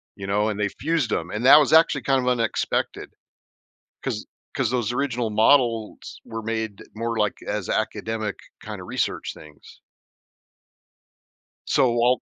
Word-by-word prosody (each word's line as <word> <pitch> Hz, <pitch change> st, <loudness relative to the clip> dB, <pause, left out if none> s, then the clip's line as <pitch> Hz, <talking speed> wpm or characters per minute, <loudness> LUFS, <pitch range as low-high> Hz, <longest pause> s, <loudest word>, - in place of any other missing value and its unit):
you 95 Hz, 0 st, -7 dB
know, 105 Hz, +2 st, +1 dB
and 105 Hz, -2 st, -2 dB
they 105 Hz, -1 st, 0 dB
fused 160 Hz, -, -1 dB
them, 85 Hz, +1 st, -1 dB
and 110 Hz, +5 st, -3 dB
that 140 Hz, -, +10 dB
was 150 Hz, +1 st, +2 dB
actually 160 Hz, -3 st, +5 dB
kind 135 Hz, -1 st, +2 dB
of 125 Hz, -, 0 dB
unexpected, 115 Hz, -3 st, -1 dB, 0.9 s
'cause -, -, -3 dB, 0.3 s
'cause -, -, +1 dB
those 120 Hz, -2 st, -1 dB
original 125 Hz, -4 st, -1 dB
models 115 Hz, 0 st, +1 dB
were 115 Hz, 0 st, -6 dB
made 110 Hz, -2 st, -3 dB
more 115 Hz, 0 st, -2 dB
like 105 Hz, -1 st, +1 dB
as -, -, -3 dB
academic 110 Hz, -2 st, -2 dB, 0.2 s
kind -, -, -7 dB
of -, -, -10 dB
research -, -, -2 dB
things. 75 Hz, -1 st, -16 dB, 1.8 s
So, 125 Hz, -, +3 dB
while 120 Hz, +2 st, +2 dB
115 Hz, 145 wpm, -24 LUFS, 105-125 Hz, 1.8 s, that